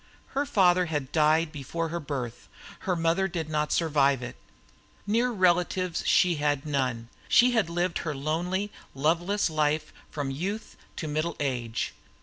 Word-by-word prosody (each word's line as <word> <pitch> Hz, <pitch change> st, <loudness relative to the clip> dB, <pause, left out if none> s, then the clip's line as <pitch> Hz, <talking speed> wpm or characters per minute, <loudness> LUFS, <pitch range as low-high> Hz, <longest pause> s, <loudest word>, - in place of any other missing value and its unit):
Her 280 Hz, +2 st, -1 dB
father 180 Hz, -7 st, +4 dB
had 145 Hz, -5 st, -3 dB
died 155 Hz, +1 st, +3 dB
before 160 Hz, +3 st, -4 dB
her 170 Hz, +2 st, -3 dB
birth; 135 Hz, -6 st, -5 dB, 0.4 s
her 180 Hz, -, +3 dB
mother 165 Hz, +3 st, +1 dB
did 165 Hz, -4 st, -4 dB
not 150 Hz, 0 st, 0 dB
survive 140 Hz, -5 st, +2 dB
it; 125 Hz, -, -6 dB, 0.7 s
near 230 Hz, +4 st, +2 dB
relatives 185 Hz, -3 st, +1 dB
she 175 Hz, -3 st, +4 dB
had 145 Hz, -1 st, 0 dB
none; 130 Hz, -6 st, -1 dB, 0.2 s
she 250 Hz, +1 st, +6 dB
had 220 Hz, -8 st, +1 dB
lived 175 Hz, +1 st, -1 dB
her 155 Hz, -3 st, -3 dB
lonely, 175 Hz, +8 st, -1 dB, 0.2 s
loveless 170 Hz, +8 st, +1 dB
life 155 Hz, -1 st, 0 dB, 0.2 s
from 145 Hz, -3 st, -3 dB
youth 200 Hz, +10 st, -4 dB, 0.2 s
to 160 Hz, -, -4 dB
middle 155 Hz, +2 st, -1 dB
age. 120 Hz, -5 st, -2 dB
160 Hz, 145 wpm, -27 LUFS, 145-180 Hz, 0.7 s, she